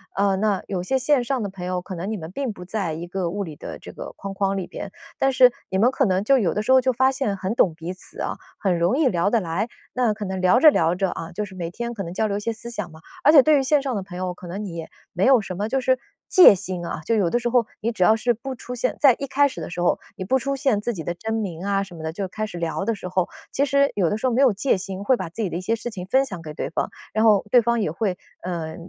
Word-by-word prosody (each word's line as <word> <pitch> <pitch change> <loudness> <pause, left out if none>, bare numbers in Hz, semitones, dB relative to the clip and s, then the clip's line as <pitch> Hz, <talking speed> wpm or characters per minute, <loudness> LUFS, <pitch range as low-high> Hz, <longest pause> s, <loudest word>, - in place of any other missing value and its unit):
呃， 200 -1 +2
那 200 0 +1
有 185 -3 -2
些 265 +8 +1
线 265 -1 +2
上 260 0 -1
的 205 - -2
朋 190 -2 -8
友， 180 0 -2
可 185 +1 -7
能 185 +5 -4
你 215 - -2
们 160 0 -8
并 265 0 -3
不 180 - -10
在 185 -4 -2
一 170 +2 -6
个 180 -1 -2
物 200 +1 -2
理 155 -4 -8
的 - - -8
这 - - -10
个 - - -8
框 195 0 -6
框 195 0 0
里 190 - -3
边， - - -7 0.3
但 270 - +2
是 250 -1 +7 0.2
你 190 - -1
们 235 +5 +5
可 265 0 +1
能 190 0 +1
就 270 +4 +4
有 190 -9 +1
的 210 - -1
时 215 - 0
候 260 - +8
就 260 0 +1
发 260 +2 +3
现 260 -7 -1
很 195 +4 -3
懂 175 -8 +3
彼 165 +3 -6
此 - - -8
啊， - - -2 0.2
很 190 -4 +1
容 170 +7 +2
易 300 - +4
聊 185 -2 +1
得 235 - +3
来， 185 +4 -2 0.3
那 245 -4 +2
可 210 0 -7
能 190 -1 -3
聊 185 +6 +4
着 310 - +9
聊 165 - +2
着， 190 +1 0
啊， 165 -1 -6
就 210 +4 -3
是 190 -2 -12
每 170 -2 -4
天 235 +4 -5
可 200 - -4
能 170 -1 -6
交 215 +4 0
流 200 -1 -1
一 - - -2
些 230 +2 -2
思 230 +2 -7
想 210 -7 -5
嘛。 160 - -13 0.2
而 295 - +7
且 295 - +9
对 305 +2 +4
于 270 - +1
线 285 +1 +3
上 265 -3 -2
的 200 - -2
朋 180 -2 -9
友， 180 -1 -3
可 180 - -12
能 185 +4 -5
你 185 -5 -6
也 165 -1 -6 0.3
没 180 +3 +1
有 260 -3 +6
什 185 -3 -6
么 205 +3 -2
就 265 +3 +1
是 255 0 +2 0.3
戒 355 - +9
心 185 -2 -5
啊， 170 - -4
就 230 - +2
有 195 -6 +2
的 240 - +1
时 240 - -2
候， 235 -2 +2
你 230 +2 -1
只 205 -5 0
要 215 +4 +6
是 240 +2 +1
不 260 +4 -6
出 250 - -8
现 250 +1 -1
在 275 -5 +6
一 275 - -3
开 285 +2 +3
始 275 - -7
的 - - -5
时 175 - -6
候， 175 - +2 0.2
你 190 - -4
不 265 +7 +2
出 275 +2 -2
现 265 -7 +1
自 240 +2 -2
己 165 - -6
的 175 - -2
真 220 +6 -4
名 185 -6 -4
啊 200 0 +1
什 185 -3 -11
么 160 - -9
的， 160 - -2
就 195 +3 -4
开 215 +4 -4
始 175 - -8
聊 170 +2 -2
的 230 +1 0
时 190 - -7
候， 180 0 0 0.2
其 280 - +1
实 280 0 +3
有 185 -5 +2
的 210 - -1
时 260 - 0
候 250 - +1
没 255 - +3
有 265 -3 +6
戒 205 +3 +1
心， 190 +1 -6
会 260 +5 +4
把 185 -7 -5
自 175 - -6
己 190 - -1
的 - - -5
一 180 - -4
些 225 +5 0
事 230 +2 -5
情 185 -4 -6
分 265 +7 +3
享 190 -9 -7
给 155 -2 -8
对 - - -3
方， - - -1 0.2
然 220 +1 +2
后 210 -3 +5
对 245 +1 +6
方 235 +1 +1
也 205 - 0
会， 185 +1 -2 0.3
呃， 170 -3 -4
205 Hz, 345 characters per minute, -23 LUFS, 180-245 Hz, 0.3 s, 着